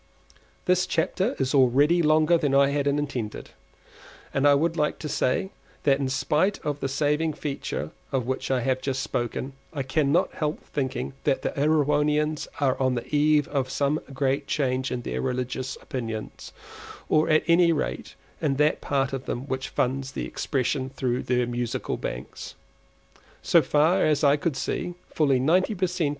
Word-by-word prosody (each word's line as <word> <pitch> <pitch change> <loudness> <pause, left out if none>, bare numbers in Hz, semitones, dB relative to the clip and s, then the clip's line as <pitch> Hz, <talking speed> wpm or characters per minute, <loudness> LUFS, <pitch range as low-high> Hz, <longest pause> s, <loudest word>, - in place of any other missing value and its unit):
This 180 0 +2
chapter 190 +8 0
is 135 0 -1
already 140 +6 +4
longer 155 +2 +4
than 145 -4 +1
I 140 0 +5
intended, 140 -5 -2 0.8
but 135 +1 +1
I 145 - +7
should 165 +3 +1
like 150 -2 0
to 155 - -6
say 150 +7 0 0.3
that 140 -1 +3
in 135 -2 -1
spite 155 +8 +1
of 145 -1 -2
the 135 - -1
saving 150 +3 +1
feature 145 -1 -4 0.2
of 130 -3 0
which 130 +1 -3
I 130 -2 +1
have 130 +1 0
just 135 -1 -2
spoken, 120 +3 -3 0.2
I 145 -4 -3
cannot 145 +5 +1
help 150 0 -3
thinking 135 -1 -3
that 135 - +1
the - - 0
Erewhonians 150 +1 +1
are 135 -3 +1
on 130 -1 +2
the 120 - -3
eve 150 0 +3
of 135 -3 -1
some 140 +3 0
great 135 +1 -1
change 130 -2 0
in 120 - -3
their 65 +1 -3
religious 125 - -3
opinions, 115 -4 -6 0.6
or 155 +1 +3
at 155 0 +4
any 170 0 +5
rate 155 - -3 0.3
in 145 -4 +1
that 150 +2 +2
part 135 -1 0
of 135 -1 -4
them 120 - -2
which 130 -1 -3
finds 135 +1 -2
expression 130 -1 -2
through 130 -2 -2
their 125 -1 +1
Musical 120 +1 -3
Banks. - - -6 0.9
So - - +5
far 160 +6 +3
as 155 -1 +2
I 140 0 +6
could 150 -1 -2
see, 175 +5 -3 0.2
fully 140 -5 +3
ninety 180 - +2
per 185 0 +1
cent. 180 -4 -1
140 Hz, 165 wpm, -25 LUFS, 130-155 Hz, 0.9 s, I